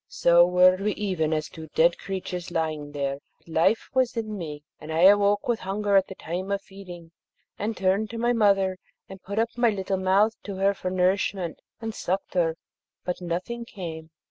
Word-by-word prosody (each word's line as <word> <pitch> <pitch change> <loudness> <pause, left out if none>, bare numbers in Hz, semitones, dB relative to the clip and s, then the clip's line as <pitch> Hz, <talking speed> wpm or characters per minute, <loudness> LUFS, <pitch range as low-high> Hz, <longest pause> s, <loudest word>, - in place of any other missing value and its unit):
So 175 0 +5
were 180 +1 +5
we 205 +2 -1
even 180 -7 -1
as 155 -1 -1
two 160 -1 -10
dead 170 +2 +4
creatures 180 -2 -5
lying 155 -3 -2
there; 140 -1 -2 0.2
but - - -35
life 170 +7 +2
was 255 -2 +1
in 215 -2 -3
me, 150 -6 -6 0.2
and 155 - -8
I 160 +1 +1
awoke 205 +2 +5
with 235 -2 +1
hunger 200 +2 -1
at 190 -1 +4
the 190 - -9
time 185 +4 -5
of 200 0 -1
feeding, 175 -4 -11 0.5
and 220 +2 -2
turned 195 +3 +1
to 230 - -6
my 240 +1 +2
mother, 195 -4 +2 0.3
and 195 0 -11
put 200 +2 -6
up 230 +1 0
my 240 -1 +3
little 195 -2 -2
mouth 195 +4 +3
to 200 - -6
her 195 +1 +2
for 185 -1 -4
nourishment, 185 -1 0 0.2
and 225 -1 -4
sucked 190 0 -3
her, 165 -3 +1 0.5
but 180 0 -3
nothing 180 +8 -3
came. 165 -8 -8
190 Hz, 195 wpm, -26 LUFS, 170-205 Hz, 0.5 s, So